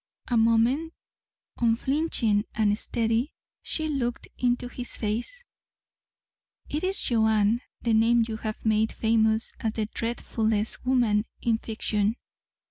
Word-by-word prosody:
A 245 Hz, -, +1 dB
moment 230 Hz, +8 st, +3 dB, 0.6 s
unflinching 230 Hz, -2 st, +1 dB
and 210 Hz, -2 st, +3 dB
steady 230 Hz, +4 st, -1 dB, 0.3 s
she 315 Hz, -1 st, -2 dB
looked 250 Hz, -5 st, -2 dB
into 245 Hz, 0 st, +1 dB
his 245 Hz, 0 st, -5 dB
face. 235 Hz, -, -3 dB, 1.2 s
"It 300 Hz, +3 st, -3 dB
is 380 Hz, +2 st, 0 dB
Joanne, 220 Hz, -1 st, +2 dB, 0.2 s
the 230 Hz, -, +2 dB
name 230 Hz, +1 st, +4 dB
you 220 Hz, -1 st, -4 dB
have 215 Hz, 0 st, -5 dB
made 220 Hz, 0 st, +2 dB
famous 220 Hz, 0 st, +2 dB
as 220 Hz, -1 st, -1 dB
the 220 Hz, -1 st, -1 dB
dreadfulest 220 Hz, -1 st, -2 dB
woman 230 Hz, -5 st, +3 dB, 0.2 s
in 225 Hz, -2 st, +2 dB
fiction. 215 Hz, -1 st, -1 dB
225 Hz, 120 wpm, -26 LUFS, 220-245 Hz, 1.2 s, name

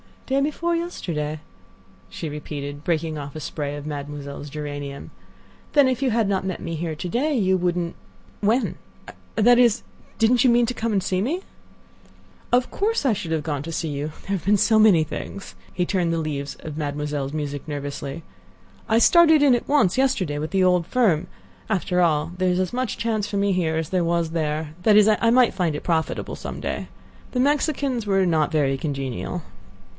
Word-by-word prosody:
"Day 270 Hz, +1 st, +1 dB
before 330 Hz, +4 st, 0 dB
yesterday," 155 Hz, -, -3 dB, 0.7 s
she 160 Hz, -, -5 dB
repeated, 145 Hz, -1 st, -6 dB
breaking 160 Hz, -2 st, -1 dB
off 140 Hz, 0 st, -7 dB
a -, -, -4 dB
spray 145 Hz, 0 st, -4 dB
of 145 Hz, 0 st, -7 dB
Mademoiselle's 145 Hz, -1 st, -6 dB
geranium; 145 Hz, -1 st, -6 dB, 0.6 s
"then 285 Hz, -3 st, +5 dB
if 255 Hz, 0 st, -1 dB
you 270 Hz, -, +2 dB
had 225 Hz, -2 st, +2 dB
not 190 Hz, -1 st, 0 dB
met 190 Hz, -2 st, -3 dB
me 165 Hz, -, -4 dB
here 160 Hz, 0 st, -3 dB
to 175 Hz, +4 st, -5 dB
day 285 Hz, -, 0 dB
you 190 Hz, -3 st, +3 dB
wouldn't—when—that 205 Hz, +6 st, -1 dB
is, 240 Hz, -2 st, +4 dB, 0.3 s
didn't 235 Hz, +1 st, +4 dB
you -, -, +6 dB
mean 240 Hz, 0 st, +4 dB
to 245 Hz, -, -2 dB
come 230 Hz, -1 st, -2 dB
and 195 Hz, -2 st, +1 dB
see 185 Hz, 0 st, 0 dB
me?" 310 Hz, -, -1 dB, 1.1 s
"Of 250 Hz, +1 st, +2 dB
course, 430 Hz, -4 st, 0 dB
I 265 Hz, -, +4 dB
should 190 Hz, -5 st, -4 dB
have 155 Hz, -2 st, -1 dB
gone 145 Hz, -2 st, -2 dB
to 165 Hz, -, -6 dB
see 160 Hz, -, -2 dB
you. 145 Hz, +1 st, -4 dB
There -, -, -16 dB
have 170 Hz, -, -11 dB
been 205 Hz, +2 st, +4 dB
so 220 Hz, +2 st, +4 dB
many 200 Hz, -7 st, +6 dB
things—" 190 Hz, +5 st, -7 dB, 0.2 s
he 180 Hz, -, -1 dB
turned 175 Hz, -3 st, 0 dB
the -, -, 0 dB
leaves 145 Hz, -3 st, -3 dB
of 155 Hz, -1 st, -7 dB
Mademoiselle's 145 Hz, -1 st, -3 dB
music 145 Hz, -1 st, -4 dB
nervously. 145 Hz, +1 st, -5 dB, 0.6 s
"I 220 Hz, -, +3 dB
started 320 Hz, +3 st, +6 dB
in 275 Hz, -3 st, +6 dB
at 240 Hz, -, 0 dB
once 255 Hz, -9 st, +3 dB
yesterday 190 Hz, -, +1 dB
with 155 Hz, +1 st, -4 dB
the 190 Hz, -1 st, +2 dB
old 180 Hz, -2 st, +3 dB
firm. 185 Hz, -8 st, +2 dB, 0.4 s
After 185 Hz, -3 st, 0 dB
all 160 Hz, -1 st, +2 dB
there 185 Hz, 0 st, +2 dB
is 180 Hz, 0 st, +1 dB
as 185 Hz, +2 st, -1 dB
much 255 Hz, -1 st, -2 dB
chance 220 Hz, -3 st, -1 dB
for 205 Hz, -, -5 dB
me 200 Hz, 0 st, +2 dB
here 170 Hz, -4 st, 0 dB
as 160 Hz, -1 st, -2 dB
there 185 Hz, -2 st, +1 dB
was 170 Hz, -1 st, 0 dB
there—that 160 Hz, +5 st, 0 dB
is, 210 Hz, 0 st, +7 dB
I 220 Hz, +2 st, +3 dB
might 245 Hz, 0 st, +5 dB
find 175 Hz, -5 st, 0 dB
it -, -, -5 dB
profitable 160 Hz, -2 st, -1 dB
some -, -, -6 dB
day. -, -, -3 dB, 0.5 s
The 250 Hz, -, 0 dB
Mexicans 275 Hz, -4 st, 0 dB
were 195 Hz, -1 st, +3 dB
not 160 Hz, -3 st, +2 dB
very 140 Hz, -3 st, +1 dB
congenial." 135 Hz, -, -4 dB
180 Hz, 190 wpm, -23 LUFS, 150-230 Hz, 1.1 s, is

